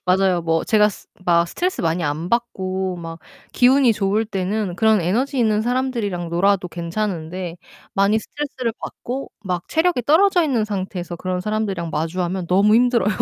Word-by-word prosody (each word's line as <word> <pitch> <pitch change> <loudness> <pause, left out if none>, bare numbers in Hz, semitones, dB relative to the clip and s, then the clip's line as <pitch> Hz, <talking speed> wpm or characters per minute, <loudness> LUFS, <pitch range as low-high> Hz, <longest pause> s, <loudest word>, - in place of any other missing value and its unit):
맞아요. 185 -1 +2
뭐 165 0 0
제가 210 -1 +4
스 200 - -10 0.2
막 170 0 +4
스트레스 365 - -2
많이 165 +1 0
안 155 +4 -2
받고 190 -6 -1
막 165 -1 -7 0.3
기운이 255 -1 +5
좋을 205 +2 0
때는 195 -1 -2
그런 220 -2 +4
에너지 250 - 0
있는 215 -2 +2
사람들이랑 230 -8 -1
놀아도 190 +2 +2
괜찮은데 175 -1 -4 0.4
많이 200 +3 +3
스트레스를 260 -2 -4
받고 260 +3 -6
막 180 -2 -3
체력이 320 -5 +1
떨어져 350 - +4
있는 255 -8 +1
상태에서 185 -4 -4
그런 185 0 -3
사람들이랑 195 -5 -2
마주하면 175 +3 -2
너무 200 +4 +4
힘들어요. 240 -3 +3
195 Hz, 375 characters per minute, -21 LUFS, 175-235 Hz, 0.4 s, 기운이